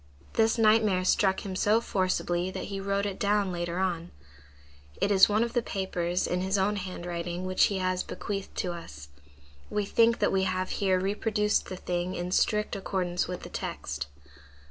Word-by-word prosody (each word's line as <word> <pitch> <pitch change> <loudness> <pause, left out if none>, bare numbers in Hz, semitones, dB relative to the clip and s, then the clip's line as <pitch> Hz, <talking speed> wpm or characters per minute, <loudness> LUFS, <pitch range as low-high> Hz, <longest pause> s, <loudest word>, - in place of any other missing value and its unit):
This 225 +1 +3
nightmare 215 -4 +4
struck 190 +1 +2
him 190 -2 -4
so 210 +4 +3
forcibly 185 -4 0
that - - -5
he 195 - -2
wrote 200 +1 0
it 200 -2 -4
down 205 -1 +2
later 175 0 -3
on. 175 -3 -1 0.9
It 200 - +1
is 190 0 +7
one 215 +2 +3
of 235 - -3
the 240 - +2
papers 180 -4 -1
in 180 0 -1
his 190 +2 +1
own 205 +2 +1
handwriting 175 -1 -4
which 185 0 +4
he 200 - -1
has 185 -1 0
bequeathed 195 -1 -5
to 180 - -1
us. 75 - -9 0.6
We 210 -1 -1
think 230 +3 +4
that - - +2
we 190 - +2
have 185 0 -1
here 190 -2 +3
reproduced 210 +2 0
the 185 - -4
thing 180 +1 -2
in 175 +1 -3
strict 210 +3 +1
accordance 185 -2 -1
with 180 0 -5
the - - -7
text. 70 +1 -4
190 Hz, 180 wpm, -28 LUFS, 180-205 Hz, 0.9 s, is